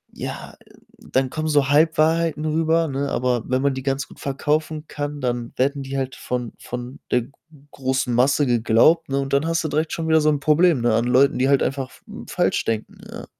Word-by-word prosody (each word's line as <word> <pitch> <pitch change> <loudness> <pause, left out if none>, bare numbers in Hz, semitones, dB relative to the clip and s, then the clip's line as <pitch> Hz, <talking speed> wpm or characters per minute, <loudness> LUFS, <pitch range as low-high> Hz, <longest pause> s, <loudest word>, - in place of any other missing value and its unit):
ja, - - -6
äh, - - -22 0.4
dann 130 -1 +1
kommen 155 0 -3
so 145 -3 +2
Halbwahrheiten 160 +1 +2
rüber, 160 +1 +1
ne? 140 0 -2
Aber 125 -2 0
wenn 130 +1 0
man 140 -1 +2
die 130 - -5
ganz 135 0 -2
gut - - -16
verkaufen 150 +3 -2
kann, 145 0 -5
dann 120 -2 -3
werden 140 +2 0
die 135 +1 -5
halt 130 -1 -3
von 125 -2 -4
von 125 +2 -7
der 125 - +3
g 120 - -15 0.4
großen 130 -1 -1
Masse 135 +4 +3
geglaubt, 120 +8 +3
ne, 135 0 0
und 135 0 -3
dann 140 +3 +2
hast 165 0 0
du - - -1
direkt 155 +2 -1
schon 165 -1 -3
wieder 160 0 +4
so 155 - +3
'n 150 -2 +1
Problem, 155 0 +3
ne, 120 -1 +2
an 115 - +1
Leuten, 130 +2 +3
die 130 +1 +2
halt 140 -1 +4
einfach 135 -1 -2
f - - -19 0.3
falsch - - 0
denken, 110 -1 -3
ja. - - -8
140 Hz, 215 wpm, -22 LUFS, 130-155 Hz, 0.4 s, wieder